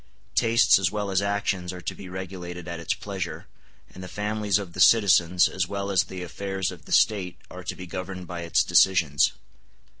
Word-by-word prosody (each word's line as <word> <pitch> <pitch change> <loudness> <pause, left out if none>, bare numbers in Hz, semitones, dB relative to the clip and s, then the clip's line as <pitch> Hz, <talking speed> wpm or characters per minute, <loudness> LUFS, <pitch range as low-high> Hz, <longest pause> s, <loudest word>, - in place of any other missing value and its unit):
Tastes 115 -3 +4
as 95 -2 +1
well 105 -2 -3
as 95 0 +2
actions 100 -3 -1
are 90 - -8
to - - -4
be 95 - -10
regulated 90 -2 -7
at 85 -1 -5
its 85 - -1
pleasure; - - -6 0.5
and 95 - -10
the - - -7
families 105 0 -1
of 95 -4 -6
the 95 - -8
citizens 90 -4 +5
as 95 -1 -2
well 100 0 -3
as 95 -1 +3
the 90 -1 -7
affairs 95 +1 -3
of 85 -5 -13
the - - -13
State 95 -5 +2
are 90 0 -9
to - - -4
be 90 - -8
governed 90 +1 -6
by 85 -1 -6
its 85 -1 +2
decisions. 85 -5 +3
90 Hz, 200 wpm, -25 LUFS, 90-100 Hz, 0.5 s, citizens